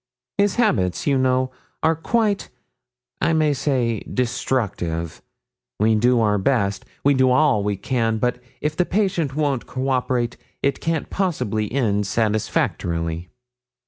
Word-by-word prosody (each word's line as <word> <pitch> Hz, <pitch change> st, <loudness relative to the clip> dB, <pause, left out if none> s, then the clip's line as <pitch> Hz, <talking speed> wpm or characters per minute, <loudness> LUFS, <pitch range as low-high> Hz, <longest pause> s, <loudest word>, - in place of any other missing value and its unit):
His 200 Hz, -1 st, +3 dB
habits, 105 Hz, -, +1 dB
you 140 Hz, -, +3 dB
know, 130 Hz, 0 st, +2 dB, 0.3 s
are 160 Hz, +1 st, +4 dB
quite, 210 Hz, +5 st, 0 dB, 0.7 s
I 165 Hz, -, +2 dB
may 155 Hz, -2 st, +3 dB
say, 130 Hz, -5 st, 0 dB
destructive. 105 Hz, -10 st, -2 dB, 0.6 s
We 110 Hz, +2 st, +4 dB
do 120 Hz, +3 st, +3 dB
our 105 Hz, -2 st, +2 dB
best 100 Hz, -3 st, 0 dB, 0.2 s
we 140 Hz, -, +5 dB
do 130 Hz, -1 st, +4 dB
all 130 Hz, -5 st, +3 dB
we 100 Hz, -1 st, -1 dB
can, 115 Hz, 0 st, 0 dB
but 125 Hz, +2 st, 0 dB, 0.2 s
if 150 Hz, 0 st, -1 dB
the 180 Hz, -, +3 dB
patient 180 Hz, -8 st, 0 dB
won't 145 Hz, -5 st, 0 dB
cooperate 130 Hz, -2 st, -1 dB, 0.3 s
it 140 Hz, -1 st, +1 dB
can't 165 Hz, -1 st, -2 dB
possibly 110 Hz, -, -1 dB
end 105 Hz, -6 st, +1 dB
satisfactorily.' 90 Hz, -6 st, -1 dB
125 Hz, 130 wpm, -22 LUFS, 105-150 Hz, 0.7 s, we